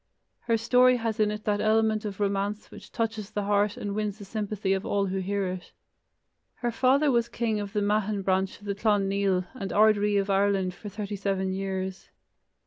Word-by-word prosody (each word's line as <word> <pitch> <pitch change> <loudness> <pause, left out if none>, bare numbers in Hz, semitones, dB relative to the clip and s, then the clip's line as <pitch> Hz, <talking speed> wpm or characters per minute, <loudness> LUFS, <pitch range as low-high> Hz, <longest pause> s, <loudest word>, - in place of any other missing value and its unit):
Her 230 -1 +3
story 250 +2 +4
has 225 -1 -2
in 210 -1 +3
it 210 0 -5
that 205 -1 0
element 220 0 +2
of 200 -2 -5
romance 200 +1 -1
which - - -12
touches 225 -3 -2
the 205 - -3
heart 205 0 +1
and 200 -1 -4
wins 210 -1 -2
the 205 - -10
sympathy 205 -1 -2
of 190 0 -1
all 200 -2 0
who 190 0 -2
hear 200 +1 -1
it. 180 -1 -6 0.8
Her 240 -1 -2
father 265 +5 +3
was 235 -1 +1
king 220 -3 -1
of 205 0 -5
the 210 - +1
Meathan 205 0 0
branch 190 0 0
of 205 - -15
the 200 - -1
Clan 205 -1 +1
Nial, 195 -2 +1
and 195 -7 -5
ard 215 0 +5
ri 205 0 +1
of 200 0 +1
Ireland 195 -2 +1
for 205 +4 -9
thirty 205 0 -5
seven 190 -1 -1
years. 190 0 -4
205 Hz, 205 wpm, -27 LUFS, 195-215 Hz, 0.8 s, ard